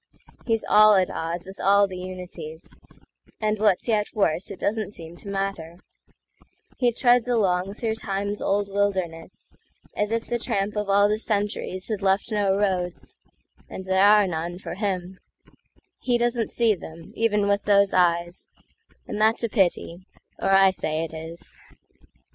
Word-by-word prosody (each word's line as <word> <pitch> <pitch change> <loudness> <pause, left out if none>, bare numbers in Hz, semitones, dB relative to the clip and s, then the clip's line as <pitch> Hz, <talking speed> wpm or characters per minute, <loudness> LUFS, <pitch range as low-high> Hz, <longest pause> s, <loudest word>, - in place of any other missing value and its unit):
He's 225 -2 0
all 215 0 +7
at 185 -1 +2
odds 170 +2 -4
with 190 +1 -11
all 200 +1 +4
the 185 -2 -7
unities, 180 -3 -8 0.7
And 215 -1 0
what's 210 -1 +2
yet 215 -3 +1
worse, 195 -4 0
it - - -8
doesn't 215 -1 -2
seem 165 0 -9
to - - -12
matter; 195 -4 -4 1.0
He 245 -2 +3
treads 245 0 +3
along 195 -5 +1
through 225 0 -2
Time's 205 -1 -3
old 200 0 0
wildernessAs 190 -4 -3 0.4
if 225 +2 -1
the 240 0 -2
tramp 200 -2 -2
of 210 -1 -2
all 200 +1 +5
the 210 +1 0
centuriesHad 205 -1 -2
left 195 +3 +1
no 200 -2 +1
roads—and 185 -1 -5
there 190 0 +2
are 205 0 +6
none, 175 0 -4
for 190 - -7
him; 185 -2 -3 0.8
He 245 -1 +1
doesn't 240 -1 0
see 230 -2 +2
them, 165 -3 -11
even 210 -3 +1
with 200 0 +1
those 200 -1 +4
eyes,—And 175 +3 -2
that's 220 +2 +3
a 230 - 0
pity, 185 -3 0 0.3
or 195 - -1
I 195 0 +6
say 155 -3 -2
it 165 - -6
is. 160 +1 -8
195 Hz, 150 wpm, -24 LUFS, 180-210 Hz, 1.0 s, all